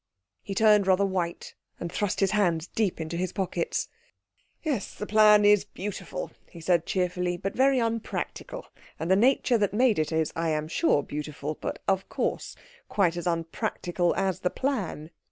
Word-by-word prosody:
He 195 - -6
turned 210 -2 +5
rather 190 +1 +4
white, 180 -3 -3 0.3
and 170 - -5
thrust 205 -1 -1
his 195 - +3
hands 175 -6 +1
deep 200 -1 -1
into 160 +1 -4
his 185 +1 -1
pockets. 200 - -2 0.8
"Yes, 280 - -2
the 210 - -5
plan 210 -1 +6
is 205 -1 +6
beautiful," 200 -2 -6 0.2
he 170 - -12
said 170 0 +1
cheerfully, 180 -1 -1
"but 195 +3 -4
very 265 +1 +4
unpractical. 230 -2 -3 0.3
And 165 +3 -1
the - - +7
nature 245 +2 +3
that 205 -1 0
made 240 -5 +3
it 155 - 0
is, 160 -1 0
I 165 -1 0
am 155 0 -1
sure, 160 -3 +2
beautiful, 150 0 -5
but - - -6
of 190 -1 0
course - - -2 0.3
quite 180 -5 +2
as 175 +1 -4
unpractical 170 +1 -1
as 190 -3 0
the 180 - 0
plan." 195 - -3
185 Hz, 170 wpm, -27 LUFS, 170-210 Hz, 0.8 s, the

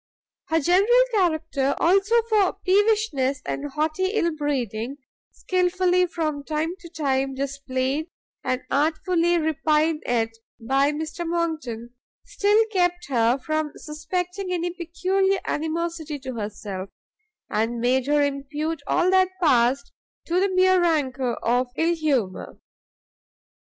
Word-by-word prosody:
Her 325 0 +2
general 395 - +4
character, 315 -8 +1
also, 395 +6 +3
for 420 -4 +3
peevishness 380 -10 +2
and 290 +1 -3
haughty 310 +6 -1
ill 340 -7 +1
breeding, 265 -4 -2 0.3
skilfully, 365 0 +1
from 310 -4 -3
time 315 +3 -2
to 340 - -12
time, 270 -4 -1
displayed, 275 +2 -2 0.4
and 255 0 -1
artfully 330 +3 +2
repined 315 0 +1
at 230 -2 +1 0.3
by 270 +5 +2
Mr 315 +3 -4
Monckton, 315 -9 -3 0.3
still 415 +2 +2
kept 355 -4 0
her 240 -1 +2
from 310 +2 -2
suspecting 360 +5 -4
any 350 0 -1
peculiar 370 +3 0
animosity 320 -1 -3
to 260 -1 -7
herself, 205 -3 -5 0.6
and 230 +2 0
made 250 +2 +1
her 295 0 +3
impute 285 +3 -3
all 360 +1 +2
that 375 -1 +4
passed 270 -4 +2 0.3
to 345 +2 +1
the 395 +1 +2
mere 370 0 +4
rancour 270 -7 0
of 245 +2 +2
ill 330 +1 +2
humour. 270 - -1
310 Hz, 120 wpm, -24 LUFS, 270-355 Hz, 0.6 s, general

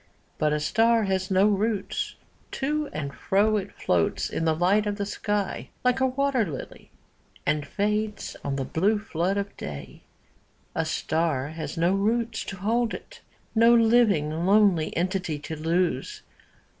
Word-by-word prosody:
'But 150 0 +2
a 150 - +1
star 225 +8 +3
has 190 -1 -1
no 190 +1 +4
roots: 210 0 0 0.4
to 295 +2 -1
and 140 -2 -4
fro 205 - +2
It 200 -1 -4
floats 85 -2 0
in 165 - -1
the 160 -1 +2
light 195 +6 +2
of 205 - -1
the 205 -1 -3
sky, 205 -1 -2
like 250 +1 +2
a 260 - +3
wat«r 270 -1 +1
]ily. 160 -11 -5 0.6
And 150 0 0
fades 210 +1 -2
on 140 - -2
the 135 -1 -2
blue 200 +10 +1
flood 195 -2 -1
of 200 0 -3
day. 75 -1 -8 0.7
A 160 - -1
star 155 -3 -1
has 160 +2 -6
do 170 +2 +2
roots 225 +3 0
to 195 - -6
hold 230 +5 0
it, - - -12 0.3
No 230 +1 +6
living 220 -9 +4 0.2
lonely 195 -6 +4
entity 180 -3 -1
to 150 +2 -6
lose. 165 -2 -1
195 Hz, 155 wpm, -26 LUFS, 160-220 Hz, 0.7 s, No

